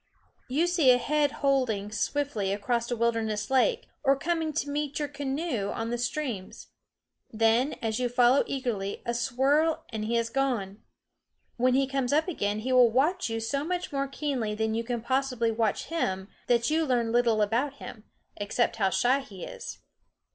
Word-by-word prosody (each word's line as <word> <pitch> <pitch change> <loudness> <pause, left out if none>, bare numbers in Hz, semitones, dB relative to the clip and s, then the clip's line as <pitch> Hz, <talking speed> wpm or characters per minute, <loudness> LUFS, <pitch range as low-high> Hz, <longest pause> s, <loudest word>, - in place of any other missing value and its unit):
You 295 +7 +2
see 350 -6 +3
a 250 - +7
head 295 +2 +1
holding 230 -7 +1
swiftly 220 -3 -1
across 235 +4 -1
a 240 - 0
wilderness 225 -2 -1
lake, 455 - +2 0.2
or 275 -1 +4
coming 325 +1 -1
to 290 - -1
meet 290 0 -2
your 295 - -1
canoe 275 - -2
on 225 +1 -3
the 240 - -1
streams; 245 -6 -4 0.6
then, 225 +5 +2
as 220 0 -1
you 250 -1 0
follow 245 +2 +4
eagerly, 230 -8 -3
a 235 - -1
swirl 270 +6 +1
and 220 -2 -4
he 235 +2 +1
is 230 0 -1
gone. 230 -7 -1 0.8
When 250 +1 +3
he 275 0 +3
comes 270 -2 -1
up 310 +3 +2
again 210 - -1
he 255 +3 -1
will 250 -2 +7
watch 295 +8 +1
you 225 0 -2
so 245 +6 -2
much 360 +3 -3
more 275 -1 -1
keenly 270 -6 -2
than 220 0 -1
you 230 +1 -1
can 240 0 -3
possibly 255 -3 0
watch 220 -2 0
him 190 - -1 0.2
that 235 +3 +2
you 320 +1 +2
learn 240 -5 +1
little 230 -3 +3
about 245 +7 0
him, 220 -5 -10 0.3
except 210 +3 0
how 195 -3 +2
shy 250 +7 +2
he 205 -9 -10
is. - - -8
245 Hz, 175 wpm, -28 LUFS, 225-280 Hz, 0.8 s, a